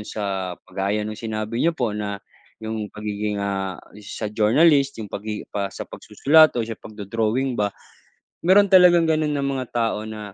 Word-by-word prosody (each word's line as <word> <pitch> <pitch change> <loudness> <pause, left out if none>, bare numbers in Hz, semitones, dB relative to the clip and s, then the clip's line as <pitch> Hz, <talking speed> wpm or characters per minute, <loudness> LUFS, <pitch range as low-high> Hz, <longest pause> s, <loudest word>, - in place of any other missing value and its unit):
Sa 95 -4 -4
kagaya 100 +2 -2
no'ng 110 - -4 0.2
sinabi 110 +2 -3
niyo 165 0 +1
po 120 -7 -1
na 105 -1 -3 0.5
'yong 110 -1 -4
pagiging, 105 0 -4
ah, 95 -2 -2 0.2
sa 105 +1 -6
journalist 140 +6 +4
'yong 105 -3 -8
pagi 105 +1 -5
pa 100 -1 -1
sa - - -7
pagsusulat 155 +1 +3
o 120 - 0
sa 115 - -6
pagdo-drawing 110 +5 -2
ba. 105 -3 0 0.7
Mayro'n 190 +4 +6
talagang 180 -3 +6
gano'n 155 -1 +1
na 145 -2 -1
mga 135 -2 -2
tao 110 -1 -1
na, 105 -2 -8
110 Hz, 165 wpm, -23 LUFS, 105-140 Hz, 0.7 s, Mayro'n